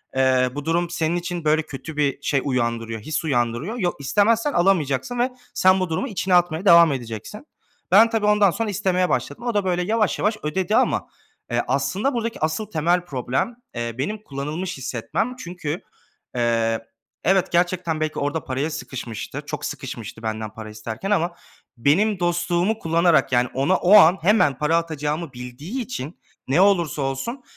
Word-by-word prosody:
eee, 130 -1 +3
bu 145 0 -5
durum 170 +1 +1
senin 170 0 -1
için, 175 -2 -4
böyle, 155 +1 +3
kötü 150 +3 -8
bir 145 -1 0
şey 140 -2 +1
uyandırıyor, 115 -3 -1
his 155 +6 -3
uyandırıyor. 125 - -1
Yo 180 -5 0
istemezsen 220 - +2
alamayacaksın 175 - +1
ve 250 +2 +2 0.2
sen 185 0 +4
bu 185 -2 -1
durumu 160 +12 -1
içine 190 -4 0
atmaya 175 +1 +2
devam 170 -3 +7
edeceksin." 120 - -7 0.4
Ben 230 0 +7
tabii 225 -3 0
ondan 210 -3 +4
sonra 225 +2 -2
istemeye 185 -1 +1
başladım. 235 - -2
O 235 - 0
da, 205 -2 +1
böyle, 180 -1 +1
yavaş, 215 +2 +1
yavaş 215 +1 +1
ödedi 175 +4 0
ama, - - +1 0.4
eee, 120 0 +2
aslında 140 - 0
buradaki 230 -1 -3
asıl 160 +7 -1
temel 175 +2 +1
problem, 130 - -2 0.2
eee, 115 -1 -3
benim 210 +11 -3
kullanılmış 150 +5 -4
hissetmem. 155 - -3
Çünkü, 170 -6 -5 0.5
eee, 115 -1 0 0.4
evet 190 +1 +2
gerçekten 175 -2 +1
belki 155 0 -2
orada 145 +2 -2
paraya 135 +4 -2
sıkışmıştır. 130 -7 -6
Çok - - -5
sıkışmıştı 115 - -7
benden 110 0 -3
para 110 -1 -8
isterken 110 - -5
ama 170 -2 +1 0.4
benim 185 - +2
dostluğumu 175 +4 0
kullanarak, 165 -4 +3
yani, 125 0 +2
ona 140 +8 +2
o 185 +4 +3
an 180 0 +7
hemen 175 - +3
para 150 +3 +2
atacağımı 155 -2 -3
bildiği 125 - -6
için 170 - -6 0.3
ne 150 +8 +3
olursa 175 -7 +2
olsun 135 - -3
165 Hz, 165 wpm, -22 LUFS, 135-190 Hz, 0.5 s, devam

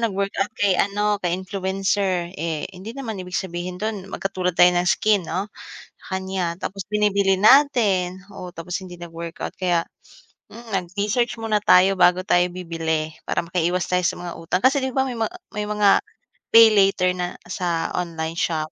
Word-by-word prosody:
nag-workout 200 -3 -1
kay, 200 -1 +3
ano, 205 +2 +1
kay 175 -1 0
influencer, 190 -1 -1
eh, 160 -3 -2
hindi 200 +7 -9
naman 225 -8 -5
ibig 180 0 -5
sabihin 180 -1 -4
dun 210 -1 -4
magkatulad 185 -2 -3
tayo 180 0 +7
ng 175 0 +1
skin, 205 +4 +3
'no, 200 +3 -3 0.6
kanya 190 -2 -2
tapos 195 -1 -5
binibili 200 -2 +2
natin. 210 -8 +4
Oo, 180 -3 -9
tapos 175 +2 -4
hindi 175 -1 -11
nag-workout 170 0 -7
kaya, 175 -3 +1 0.7
hmm, 230 -3 -5
nag-research 205 +6 -1
muna 215 -2 0
tayo, 190 +2 +5
bago 180 0 +4
tayo 175 0 +4
bibili 165 -3 -2 0.2
para - - -1
makaiwas 175 +1 -1
tayo 180 0 +1
sa - - +1
mga 175 -1 -6
utang. 165 +2 -2
Kasi, 265 +3 +3
'di 265 - -2
ba 265 +1 +1
may 245 - -5
mga 225 +7 -2 0.2
may 210 - -1
mga 210 -1 +3 0.7
pay 230 -1 +9
later 195 -3 +3
na 180 -1 -4 0.2
sa 175 -3 -1
online 165 -1 -4
shop. 155 -2 -1
185 Hz, 165 wpm, -22 LUFS, 175-205 Hz, 0.7 s, pay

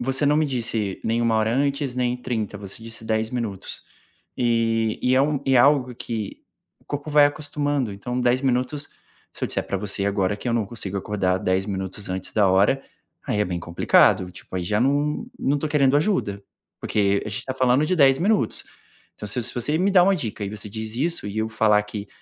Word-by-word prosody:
Você 135 +3 0
não 150 +1 +4
me 155 -1 +2
disse 115 -6 -2
nem 115 +1 +1
1 115 -1 +2
hora 110 +2 +1
antes 140 -1 0
nem 125 -1 0
30, 115 -4 -3
você 100 +2 -7
disse 115 0 -7
10 110 0 -1
minutos. 115 -6 -4 0.5
E 115 -2 +1
e 125 +1 +3
é 130 - +5
um 145 -1 0
e 135 - +3
é - - +6
algo 130 -1 +4
que 110 -3 -5 0.4
o - - -28
corpo 145 +1 -5
vai 145 -1 +6
acostumando, 145 -5 -2
então 125 +6 -4
10 125 +1 +2
minutos, 130 +3 -1 0.4
se - - -4
eu - - 0
disser - - -1
para 100 - -2
você 100 -1 -1
agora 100 0 0
que 125 - -5
eu - - +1
não 110 -4 0
consigo 100 -3 -4
acordar 95 -2 0
10 95 +2 0
minutos 95 0 -4
antes 95 0 -4
da 105 -3 +3
hora, 100 +9 +3 0.4
aí 105 - 0
é - - +3
bem 90 -2 -3
complicado, 85 +1 +3
tipo 95 - -12
aí 90 - -2
já 105 +4 0
não 145 - +1
não 140 - +1
estou 150 +2 -2
querendo 140 -2 +4
ajuda, 145 - 0 0.4
porque 100 -1 +1
a - - -5
gente 100 - -3
está 130 - -5
falando 130 +2 +3
de 185 - +1
10 135 -3 +5
minutos. 190 - +1 0.5
Então, 105 - -8
se 115 +4 +1
se 120 - 0
você 125 +6 0
me 195 +2 +2
dá 185 -2 +6
uma 195 +1 +3
dica 110 -7 -5
e 100 - -3
você 105 -1 -6
diz 110 +1 -6
isso 165 -2 -1
e 100 +1 -6
eu 110 0 0
falar 105 -2 +3
que, 105 -1 -7
115 Hz, 220 wpm, -23 LUFS, 105-135 Hz, 0.5 s, é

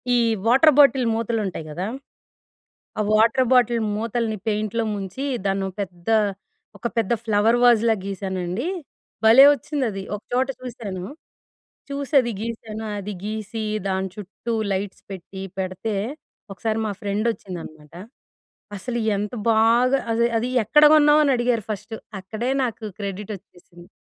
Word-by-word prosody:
ఈ - - +4 0.3
water 270 +5 +6
bottle 270 -3 +6
మూతలు 230 0 -1
ఉంటయి 165 -4 -6
గదా! 180 +6 -3 1.1
ఆ - - +3
వాటర్ 230 +3 +4
బాటిల్ 240 -2 +4
మూతల్ని 225 -1 -2
పెయింట్‌లో 215 +2 -1
ముంచి, 200 +8 -5 0.2
దాన్నో 195 0 0
పెద్ద 180 0 -9 0.7
ఒక 195 - -4
పెద్ద 225 0 +1
ఫ్లవర్ 220 +2 +3
వాజ్‌లా 230 -2 +5
గీసానండి, 190 - -3 0.6
భలే 250 +5 +9
ఒచ్చిందది. 240 -8 -3
ఒక 205 - -14
చోట 260 +1 +2
చూసాను, 205 -7 -6 0.9
చూసి 280 +1 -4
అది 240 -2 -3
గీసాను 220 -1 -5 0.2
అది 205 +1 -5
గీసి, 215 +1 -4 0.2
దాన్చుట్టూ 190 +4 -4 0.2
లైట్స్ 195 +1 -4
పెట్టి, 190 +1 -8 0.2
పెడితే 190 +3 -3 0.6
ఒకసారి 220 +3 -2
మా 210 - -2
ఫ్రెండొచ్చిందనమాట. 185 -7 -4 0.8
అసలు 240 +5 -4 0.2
ఎంత 205 +1 -3 0.2
బాగా 235 +4 +4
అది 235 +1 +2
"అది 240 +3 0 0.2
ఎక్కడ 300 +8 +5
గొన్నావు?" 300 0 +6
అని 280 - +3
అడిగారు 240 -2 +1
ఫస్ట్. 215 +2 -5 0.3
అక్కడే 220 +6 -3
నాకు 225 -3 -3
క్రెడిడొచ్చేసింది. 190 -3 -8
220 Hz, 120 wpm, -23 LUFS, 195-240 Hz, 1.1 s, భలే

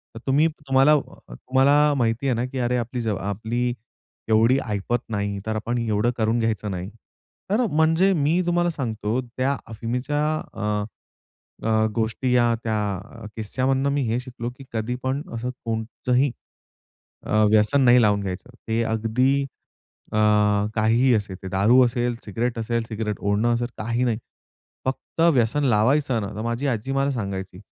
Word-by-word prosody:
तर - - -6
तुम्ही 145 +4 +4 0.2
तुम्हाला 135 +2 +5
अ, 150 - +5 0.3
अ, - - -11
तुम्हाला 140 - +3
माहिती 120 +2 0
आहे 125 - +2
ना 120 - -1
की 130 +1 -5
अरे 125 0 +1
आपली 120 +1 -3
जवाब 110 -4 -2
आपली 120 +3 -1 0.6
एवढी 115 +4 +4
ऐपत 105 +4 -1
नाही 100 -2 -2
तर 110 0 -2
आपण 120 +3 -2
एवढं 115 0 +1
करून 110 +1 +1
घ्यायचं 110 -2 -1
नाही. 90 0 -4 0.6
तर 235 +4 +3
म्हणजे 160 +5 +3
मी 160 +2 +2
तुम्हाला 175 0 +2
सांगतो 115 -6 -2
त्या 130 +3 -2
अफीमीच्या 125 +6 -2 0.3
अ, - - -7 1.1
अ, 110 0 +3
गोष्टी 115 +3 -1
या 120 -1 +4
त्या 110 -1 0 0.5
अ, - - -8
किस्स्यामधनं 130 +5 0
मी 145 - +1
हे 115 +2 0
शिकलो 125 -2 -6
की 135 - -11
कधी 115 +2 -2
पण 130 +2 -1
असं 120 +2 -3 0.2
कोणचंही, 120 +4 0 0.9
अ, 110 0 +2
व्यसन 110 +6 +4
नाही 125 -1 +6
लावून 105 -2 +3
घ्यायचं. 95 +4 -5 0.2
ते 115 +1 +1
अगदी 115 +5 +1 0.7
अ, - - -2 0.6
काहीही 115 +4 +3
असेल, 100 -3 -2
ते 95 - -5
दारू 110 +7 +5
असेल, 120 0 0
सिगरेट 115 +3 -2
असेल, 115 +1 -1
सिगरेट 110 -2 -3
ओढणं 105 +4 +1
असेल 120 +1 -1
काही 115 +3 -1
नाही. 115 -3 0 0.7
फक्त 130 +4 -4
व्यसन 125 +4 +2
लावायचं 125 +2 +2
ना 100 - -3
तर 110 - -4
माझी 115 +4 -2
आजी 125 +2 -2
मला 135 +1 +1
सांगायची, 100 -6 -4
120 Hz, 160 wpm, -23 LUFS, 110-130 Hz, 1.1 s, नाही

